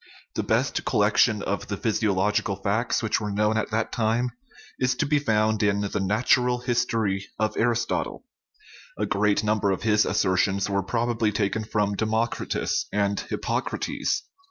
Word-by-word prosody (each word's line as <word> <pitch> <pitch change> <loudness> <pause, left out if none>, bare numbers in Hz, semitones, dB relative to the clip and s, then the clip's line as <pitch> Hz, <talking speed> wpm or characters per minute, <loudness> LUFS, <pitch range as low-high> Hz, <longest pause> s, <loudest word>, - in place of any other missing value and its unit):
The - - -1
best - - 0
collection 110 -4 +2
of 100 - -3
the 100 - -3
physiological 105 -1 +1
facts 110 +5 -1
which 110 0 0
were 105 - -2
known 105 +2 +1
at 110 - -1
that 110 0 -1
time 115 +2 0 0.5
is 125 -1 +1
to 135 - 0
be 150 0 +2
found 110 -4 +1
in 100 -1 +2
the 100 0 -2
Natural 125 +5 +2
His 120 0 0
tory 100 -3 -1
of 110 -1 -1
Aristotle; 120 0 -1 0.7
a - - 0
great 105 +1 +1
number 105 -1 +1
of 95 - -1
his 105 -1 +4
assertions 95 +1 +1
were 100 -1 0
probably 115 +1 0
taken 105 +1 -1
from 105 -1 0
Democritus 110 +3 -1
and 100 -1 0
Hippocrates. - - -2
110 Hz, 155 wpm, -25 LUFS, 100-115 Hz, 0.7 s, his